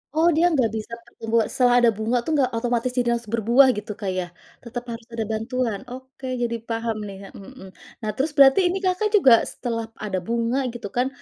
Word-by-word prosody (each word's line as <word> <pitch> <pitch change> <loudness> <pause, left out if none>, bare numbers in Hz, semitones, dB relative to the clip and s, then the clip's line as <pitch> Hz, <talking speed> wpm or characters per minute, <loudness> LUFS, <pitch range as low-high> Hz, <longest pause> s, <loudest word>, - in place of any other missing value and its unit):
Oh, 320 +2 +4
dia 335 +2 +3
nggak 260 -8 +2
bisa 220 +1 -6 0.2
pertumbu 225 -1 -5
setelah 245 -1 +3
ada 240 - +5
bunga 225 +3 0
tuh, 320 - -2
nggak 260 -3 +2
otomatis 240 +1 -1
jadi 240 -1 +2
langsung 235 -2 -7
berbuah 240 +5 +5
gitu, 210 0 -5
Kak, 195 -3 -2
ya? 180 - -2 0.4
Tetap 240 0 -6
harus 230 0 -8
ada 225 -1 -2
bantuan? 225 -1 -2
Oke, 260 +1 -10 0.2
jadi 235 -1 -1
paham 225 -1 -2
nih, 195 -1 -8
a - - -11
mhm. 190 -1 -12 0.4
Nah, 215 - -2
terus, 290 +6 -1
berarti 275 +5 +7
ini 360 - -1
Kakak 370 +3 +1
juga, 270 - +7 0.2
setelah 230 -2 -4
ada 195 -3 -3
bunga, 235 +2 0 0.2
gitu 235 -4 -6
kan, 250 +4 0
235 Hz, 205 wpm, -23 LUFS, 225-260 Hz, 0.4 s, berarti